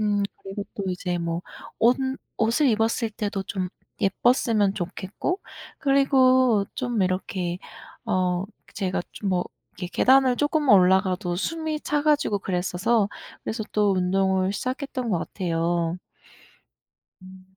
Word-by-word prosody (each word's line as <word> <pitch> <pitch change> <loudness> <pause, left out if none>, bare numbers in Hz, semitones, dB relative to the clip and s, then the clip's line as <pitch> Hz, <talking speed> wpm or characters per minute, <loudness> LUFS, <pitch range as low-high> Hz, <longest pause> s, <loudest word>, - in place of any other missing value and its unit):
음 205 -1 +1 0.2
그리고 195 +1 -5
또 200 - -4
이제 180 -1 -2
뭐 170 +1 -2 0.4
옷 240 +2 +5 0.4
옷을 230 +7 +3
입었을 225 0 +1
때도 205 -2 -3
좀 185 -1 -3 0.3
예뻤으면 210 -1 +2
좋겠고 190 - -3 0.4
그리고 260 -6 +4
좀 240 -5 -1
이렇게 185 -1 -2 0.5
어 180 -1 +1 0.3
제가 190 -3 -1
좀 200 - -4
뭐 180 -1 +1 0.3
계 180 - -4
계단을 260 +5 +4
조금만 290 -5 +3
올라가도 185 -1 +2
숨이 315 - -2
차 295 -1 0
가지고 295 -9 +2
그랬어서 195 +4 +1 0.4
그래서 220 0 -3
또 205 -2 +3
운동을 190 +1 +1
시작했던 255 +1 -3
것 175 - +1
같아요. 170 -1 -1 1.3
음. 185 0 -13
200 Hz, 250 characters per minute, -25 LUFS, 185-245 Hz, 1.3 s, 옷